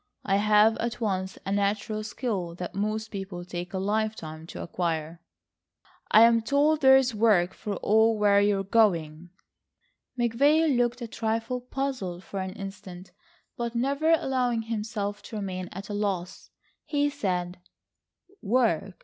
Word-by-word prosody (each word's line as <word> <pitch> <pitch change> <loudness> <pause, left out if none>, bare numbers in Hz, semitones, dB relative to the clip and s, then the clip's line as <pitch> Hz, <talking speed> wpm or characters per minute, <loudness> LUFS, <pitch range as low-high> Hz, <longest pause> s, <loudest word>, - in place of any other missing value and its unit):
I 195 -1 +2
have 210 +1 +4
at 235 +1 -3
once 190 -4 -2
a 195 - -3
natural 205 +2 -1
skill 210 -6 -3
that 180 0 -6
most 215 +2 -2
people 190 -3 -6
take 175 0 -6
a 190 - -3
lifetime 195 -6 -2
to - - -7
acquire." 165 -1 -3 0.9
"I'm 230 +1 +6
told 290 +6 +2
there's 265 -2 +6
work 205 -5 +3
for 205 -1 -5
all 220 +3 +3
where 205 -1 +4
you 205 0 +2
are 195 - -2
going." 175 -6 +1 0.9
McVay 285 +6 +3
looked 245 0 0
a - - -4
trifle 225 +3 -2
puzzled 250 -9 -4
for 195 - -6
an 190 0 -4
instant, 190 -2 -9 0.4
but 235 -2 -4
never 280 +6 +2
allowing 250 -6 +1
himself 210 -2 -4
to - - -10
remain 185 -3 -4
at 195 +2 -8
a 210 - -5
loss, 195 -4 -3 0.3
he 290 -1 0
said: 180 -10 -2 0.8
"Work! 200 -5 +1
210 Hz, 140 wpm, -27 LUFS, 190-235 Hz, 0.9 s, I'm